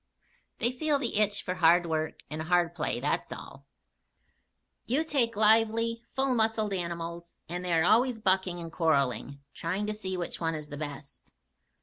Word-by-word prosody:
They 240 - +1
feel 290 +3 +1
the 245 -6 -1
itch 205 -1 +1
for 180 - -2
hard 175 0 +4
work 160 -1 -2
and 155 +1 -5
hard 170 +1 +2
play, 150 -7 -1
that's 145 +4 -1
all. 135 +1 -10 1.2
You 275 +7 +2
take 260 -8 0
lively, 225 +2 +3
full 265 -1 +2
muscled 220 -3 +1
animals, 170 -1 -4
and 175 +1 -4
they 180 -1 0
are 160 -1 +4
always 230 +6 +4
bucking 190 -4 +1
and 165 -1 -7
quarreling 140 -5 0
trying 185 +5 -2
to 215 - -2
see 190 -3 -4
which 175 - -3
one 165 -1 -1
is 150 -1 -7
the 145 - -6
best. 145 -1 -8
180 Hz, 165 wpm, -29 LUFS, 165-220 Hz, 1.2 s, hard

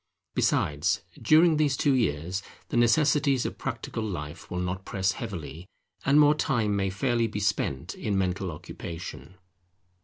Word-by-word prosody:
Besides, 75 +6 +1 0.2
during 160 +1 +5
these 145 -3 +2
two 140 - +3
years, 95 - 0 0.3
the - - -3
necessities 135 +2 +3
of - - -4
practical - - -4
life 85 -7 -5
will 90 - -4
not 90 +1 -2
press 95 0 0
heavily, 85 - -7 0.4
and 140 +2 +5
more 150 0 +7
time 120 -9 0
may 95 -1 0
fairly 115 +4 +1
be 105 -1 -4
spent 95 -9 -1
in 100 -2 -2
mental 95 0 -1
occupation. 80 0 -8
100 Hz, 145 wpm, -27 LUFS, 90-130 Hz, 0.4 s, more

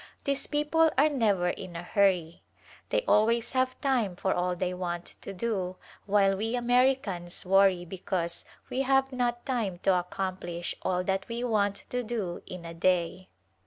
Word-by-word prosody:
These 280 0 -1
people 305 +2 +3
are 295 +3 +5
never 205 -10 +2
in 180 -1 -6
a 170 - -5
hurry. 180 -4 +1 0.5
They - - +1
al 215 +1 +5
ways 235 0 0
have 255 -1 0
time 245 -10 +1
for 190 +1 0
all 180 0 0
they 180 +1 -1
want 175 -1 -3 0.2
to - - -6
do 190 -3 -2 0.3
while 195 -1 +4
we 225 +4 -1
Americans 245 -9 +1
worry 190 -1 +4
because 175 -1 -2 0.3
we 260 - 0
have 270 0 +2
not 240 -2 -1
time 225 -9 -1
to 195 - +4
ac 180 0 -1
complish 175 -2 -3
all 180 -1 0
that 195 +3 -1
we 235 +1 -3
want 205 -4 0
to 250 - 0
do 215 -7 -3
in 180 -2 -8
a 165 - -6
day. 180 +1 0
195 Hz, 170 wpm, -29 LUFS, 180-245 Hz, 0.5 s, are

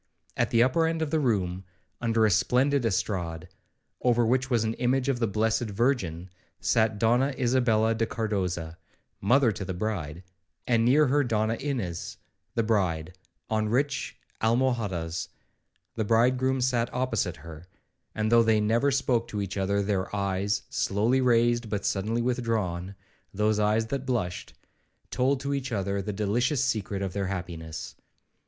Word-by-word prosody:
At - - +1
the 115 0 +4
upper 160 +6 +2
end 165 0 -1
of 150 - -4
the 160 - +2
room, 95 -9 0 0.4
under 115 -2 +2
a 105 - +3
splendid 125 +9 +2
estrade, 90 -4 -2 0.5
over 120 -1 +3
which 130 +3 +1
was 120 -4 +2
an 110 0 -1
image 130 +2 +1
of 130 -3 0
the 115 - +1
blessed 110 +3 0
Virgin, 100 - -1 0.3
sat 110 -2 +1
Donna 125 +6 +2
Isabella 120 -3 +2
de 115 0 -1
Cardoza, 90 -8 -3 0.4
mother 120 +4 +4
to 100 - -5
the 95 -1 -4
bride, 90 -5 -4 0.4
and 115 -2 +2
near 140 +6 +5
her 145 +2 +2
Donna 110 -2 0
Ines, 115 - -4 0.4
the 115 - +2
bride, 90 -6 0 0.3
on 110 -1 0
rich 135 +4 -1 0.2
almohadas; 110 -8 0 0.7
the 110 - -1
bridegroom 125 +4 +2
sat 125 -2 +1
opposite 115 -9 -1
her; 80 +1 -11 0.5
and 110 0 0
though 115 0 +7
they 110 -1 +3
never 115 +6 +2
spoke 125 -4 +1
to 105 -3 -4
each 100 -1 -4
other, 100 +1 0
their 100 0 -2
eyes, 100 0 -1
slowly 115 +7 +1
raised, 120 -1 +2
but 105 -2 -3
suddenly 110 +4 0
withdrawn, 110 -7 -2 0.4
(those 105 +1 +1
eyes 105 +2 +2
that 135 +3 -4
blushed), 105 -9 -2 0.6
told 130 +2 +1
to 140 0 -2
each 135 -2 -3
other 100 -2 -1
the 105 - -4
delicious 120 +7 0
secret 100 -4 -2
of 95 -2 -3
their 100 -1 -2
happiness. 85 -4 -6
110 Hz, 155 wpm, -27 LUFS, 100-125 Hz, 0.7 s, though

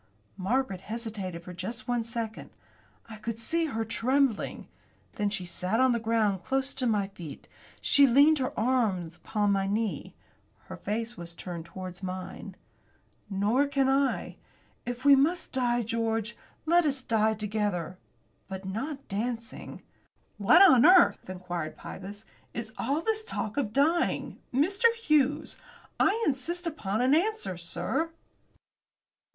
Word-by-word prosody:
Margaret 195 -1 -1
hesitated 205 -6 -5
for 180 - -9
just 220 +9 -6
one 245 -1 0
second. 230 -1 -5 0.6
I 220 -1 -9
could 225 +1 -4
see 330 +9 -1
her 225 -7 -2
trembling. 245 +2 0 0.5
Then 205 -1 0
she 190 -3 -4
sat 180 +5 -1
on 260 0 +5
the 235 - +1
ground 220 -4 +1
close 270 0 -1
to 255 -2 -1
my 205 -3 +1
feet. 170 -7 -10 0.3
She 280 -1 +5
leaned 285 +5 +5
her 255 - -1
arm 215 -8 +1
upon 205 +4 0
my 195 -1 +1
knee. 215 +1 -2 0.5
Her - - -9
face 230 +3 -3
was 170 0 -8
turned 170 -2 -6
towards 185 +1 -8
mine. 185 -1 -6 0.7
"Nor 215 +8 +2
can 275 -1 +1
I. 270 0 +1 0.5
If 245 +2 -5
we 280 -1 +9
must 315 +6 +1
die, 240 -2 +1
George, 225 0 -1 0.3
let 345 +2 +4
us 275 -4 0
die 220 -2 +2
together; 205 -4 -2 0.5
but 190 0 -7
not 270 +9 -4
dancing." 230 +3 -5 0.6
"What 275 - +7
on 265 -11 +7
earth," 360 - +6
inquired 175 -4 -5
Pybus, 205 +3 -9 0.3
"is 225 -2 -5
all 280 +6 0
this 440 +3 0
talk 215 - -4
of 265 -8 -1
dying, 310 +7 +1
Mr. 390 - +3
Hughes? 305 - +1 0.4
I 445 +3 +3
insist 335 +6 -1
upon 220 - -2
an 260 +2 +4
answer, 405 - +1
sir." 175 - -2
230 Hz, 140 wpm, -28 LUFS, 200-275 Hz, 0.7 s, we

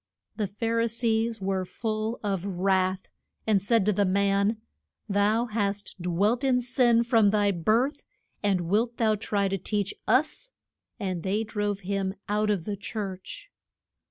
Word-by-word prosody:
The 210 -3 -1
Phar 230 +4 -1
i 230 - +2
sees 225 0 0
were 190 -1 0
full 215 +4 -3
of 195 -4 -1
wrath, 190 0 0 0.4
and 210 -3 +3
said 215 0 +2
to 210 - +3
the 205 - +2
man, 200 +2 +2 0.5
Thou 210 +3 +2
hast 205 -4 -3
dwelt 200 +8 +1
in 260 -2 +3
sin 240 -1 +3
from 225 -4 +4
thy 205 -1 +2
birth, 220 - +1 0.4
and 195 -3 +1
wilt 220 +7 0
thou 220 -2 +3
try 200 -1 0
to 195 0 -2
teach 205 +2 -1
us? 300 - +1 0.5
And 185 -5 -2
they 200 +5 0
drove 205 -2 -2
him 195 0 -2
out 210 0 +1
of 195 -6 0
the 210 - -2
church. 195 -2 -6
205 Hz, 155 wpm, -27 LUFS, 195-225 Hz, 0.5 s, from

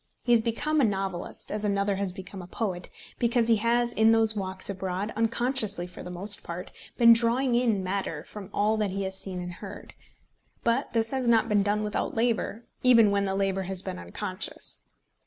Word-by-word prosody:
He 240 - 0
has 235 -2 +6
become 290 +7 0
a - - +3
novelist, 195 -4 -3
as 210 0 -3
another 200 -1 0
has 195 -1 -1
become 190 +1 -9
a 175 - -10
poet, 180 -3 -4 0.3
because 235 -1 +2
he 225 - +5
has 235 +2 +1
in 220 +1 +4
those 225 -1 +3
walks 190 -2 -3
abroad, 190 +2 -3
unconsciously 225 -4 0
for 180 - -11
the - - -8
most 195 +4 +2
part, 175 +1 -7 0.3
been 235 -1 +8
drawing 235 +3 +2
in 235 -5 +2
matter 185 -5 -3
from 205 0 -10
all 210 +2 +1
that 210 -2 0
he 195 +1 -3
has 190 0 -2
seen 190 -1 -2
and 180 0 -5
heard. 205 -1 -9 0.7
But 235 0 0
this 225 -1 +1
has 260 -2 -1
not 230 -1 +4
been 210 -2 +3
done 205 +1 0
without 210 0 -2
labour, 230 -1 -1 0.2
even 230 -5 +6
when 200 0 +1
the 190 0 -1
labour 195 -1 0
has 190 -1 +1
been 90 - -5
unconscious. 85 0 -2
210 Hz, 195 wpm, -27 LUFS, 190-230 Hz, 0.7 s, been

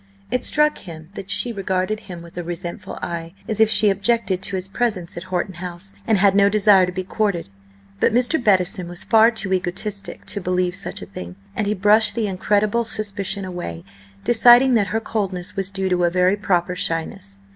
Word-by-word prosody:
It 250 - 0
struck 300 0 +2
him 160 -3 -11
that 195 -2 -8
she 210 +4 +1
regarded 190 +1 -2
him 175 -5 -10
with 170 - -14
a 175 - -4
resentful 175 +2 -6
eye, 170 +1 -5
as 220 -1 -2
if 220 -1 +5
she 215 -2 +4
objected 200 -2 0
to 195 - -1
his 185 0 -3
presence 200 -5 -2
at 175 - -7
Horton 185 0 -2
House, 180 +2 -7
and 220 -2 +3
had 195 0 +4
no 200 0 +4
desire 200 -3 +5
to - - -3
be 185 +1 -4
courted. 195 - -2 0.5
But - - +3
Mr. 250 +4 +2
Bettison 185 -3 +2
was 175 0 -5
far 225 0 +5
too 215 -5 +1
egotistic 190 +3 -3
to 200 - -4
believe 180 0 0
such 180 - -4
a - - -7
thing, 90 -1 -9 0.2
and 215 - -1
he 210 - 0
brushed 210 +3 +3
the 230 -2 0
incredible 205 +4 +1
suspicion 200 -3 -2
away, 175 - -6 0.4
deciding 240 +2 +6
that 210 -4 +2
her 220 +4 -1
coldness 195 -5 -3
was 195 -1 -2
due 195 -1 -2
to 180 -1 +2
a - - +3
very 180 +2 +2
proper 180 -3 0
shyness. 165 - -3
195 Hz, 200 wpm, -21 LUFS, 180-215 Hz, 0.5 s, deciding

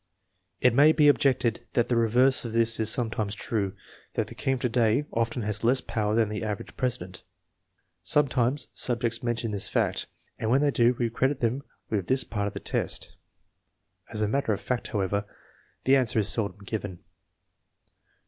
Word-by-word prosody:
It 125 - +4
may 145 +5 +6
be 150 -2 +4
objected 125 -5 +2
that 120 -1 +2
the 120 - +2
reverse 120 +3 +4
of 115 -2 -5
this 115 0 +3
is 110 -1 +2
sometimes 110 -4 0
true, 100 -2 -2 0.4
that - - 0
the - - -11
king 135 - -1
of 125 - -7
to 125 - 0
day 115 +3 +2
often 115 +1 -1
has 105 +1 -2
less 125 +3 +3
power 105 -3 -2
than 115 -1 +3
the 105 +1 -4
average 105 -2 -5
president. 90 -8 -3 0.8
Sometimes 135 -1 +1
subjects 120 -1 -1
mention 120 -2 -2
this 100 -2 -1
fact, - - 0 0.3
and 110 - -2
when 130 +4 +3
they 145 -1 +3
do 120 -1 +3
we 120 -2 -1
credit 130 +4 0
them 120 +3 0 0.3
with 100 -5 -1
this 130 0 +2
part 105 -2 -3
of - - -5
the - - -5
test. - - -3 1.0
As 105 - -3
a - - +1
matter 125 -1 0
of 100 - -3
fact, 125 -2 -3
however, 100 0 -1 0.6
this 135 - +5
answer 125 -4 +1
is 105 -1 +3
seldom 100 -2 +1
given. 100 -3 -5
115 Hz, 180 wpm, -27 LUFS, 105-125 Hz, 1.0 s, may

